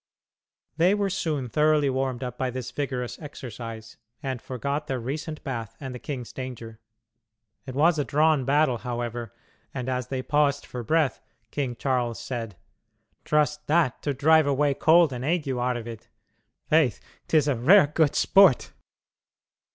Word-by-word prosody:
They 180 +5 +4
were 200 -2 -1
soon 160 -8 -2
thoroughly 150 +3 +2
warmed 130 -1 -1
up 125 -1 -5
by 130 0 -2
this 125 0 -5
vigorous 130 -3 -4
exercise, 115 -6 -8 0.3
and 130 -3 -3
forgot 140 +4 -3
their 130 -1 -2
recent 150 +6 -5
bath 115 -4 -5
and 130 -3 -6
the 125 - -7
king's 125 -4 -6
danger. 120 -4 -7 0.9
It 130 - -6
was 155 +2 +3
a - - +2
drawn 150 0 +2
battle, 135 -2 +2
however, 120 -2 -4 0.4
and, 130 -2 -4
as 125 -2 -2
they 130 -1 -3
paused 145 +1 +1
for 125 - -6
breath, 155 +4 +1 0.3
King 130 -4 -2
Charles 125 -3 -1
said: 115 -4 -5 0.7
"Trust 150 0 +1
that 155 -5 +2
to 145 - -1
drive 155 +3 +4
away 140 0 +2
cold 160 +1 +4
and 125 0 -5
ague, 160 +1 0
Arvid. 120 -3 -3 0.6
Faith,'tis 155 0 +1
a 145 - +3
rare 165 - +6
good 150 0 +1
sport." 195 -9 +4
135 Hz, 145 wpm, -26 LUFS, 125-150 Hz, 0.9 s, rare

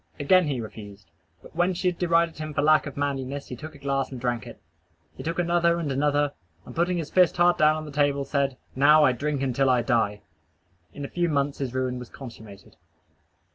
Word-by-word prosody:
Again 180 +4 +4
he 135 -4 -2
refused. 105 -5 -10 0.3
But - - -15
when 175 +2 +1
she 185 +1 -1
had 175 - -7
derided 170 -2 +1
him 155 -1 -6
for 140 - +1
lack 155 0 +4
of 140 - -8
manliness 140 -1 -3
he 125 - -5
took 155 +5 -9
the - - -13
glass 140 -1 -2
and 130 - -6
drank 120 -3 -2
it. - - -11 0.6
He - - -8
took 165 +1 -3
another 170 -1 +2
and 160 -4 -2
another; 145 +1 +1 0.3
and - - -11
putting 175 +2 +1
his 160 -3 -4
fist 180 -2 +4
hard 175 0 +4
down 155 0 +5
on 155 0 -5
the 150 - -8
table, 140 -1 +1
said, 140 -2 -1 0.2
"Now 150 +3 +6
I 130 - +5
drink 140 +2 -2
until 135 +1 +1
I 125 -2 +3
die." 110 -4 0 0.7
In 145 - -7
a - - -5
few 175 +2 -1
months 140 -1 -1
his 130 -2 -4
ruin 130 -1 -1
was 125 - -9
consummated. 110 -6 -12
145 Hz, 215 wpm, -25 LUFS, 130-160 Hz, 0.7 s, Now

